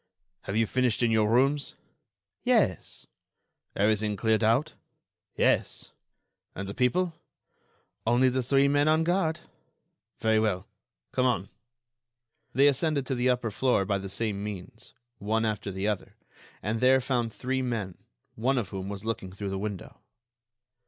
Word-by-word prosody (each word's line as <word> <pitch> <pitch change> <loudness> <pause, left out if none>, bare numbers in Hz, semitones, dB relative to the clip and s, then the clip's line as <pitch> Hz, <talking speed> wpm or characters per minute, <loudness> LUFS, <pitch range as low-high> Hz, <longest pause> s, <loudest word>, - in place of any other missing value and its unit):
"Have 100 - -3
you 115 - +3
finished 125 0 +1
in 115 - +3
your 110 -1 +3
rooms?" 135 +4 +2 0.7
"Yes." - - +1 0.7
"Everything 105 +1 +1
cleared 110 +2 +1
out?" 115 +8 +2 0.6
"Yes." - - +1 0.6
"And 100 +1 -5
the 100 - -5
people?" 165 - +1 0.9
"Only 120 +3 +4
the 130 +1 +1
three 135 +3 +3
men 145 +1 +3
on 155 +1 +4
guard." 170 -1 0 0.8
"Very 110 0 +2
well; 100 -4 0 0.5
come 130 0 +2
on." 100 -6 -1 1.0
They 140 +2 +5
ascended 145 0 +1
to 135 - -2
the 125 0 +1
upper 125 -3 0
floor 120 -3 +1
by 100 0 0
the 95 0 -6
same 100 0 -2
means, 105 +2 -8 0.2
one 110 +2 0
after 105 -2 -2
the 95 +2 -2
other, 105 -3 -3 0.5
and 110 +2 -1
there 130 +2 +5
found 125 -3 -1
three 130 +4 -2
men, 110 -8 -3 0.4
one 130 +4 0
of 110 -7 -1
whom 95 0 -5
was 100 +1 -7
looking 105 -4 -3
through 100 +1 -5
the 95 - -3
window. 100 -3 -6
115 Hz, 145 wpm, -28 LUFS, 105-130 Hz, 1.0 s, They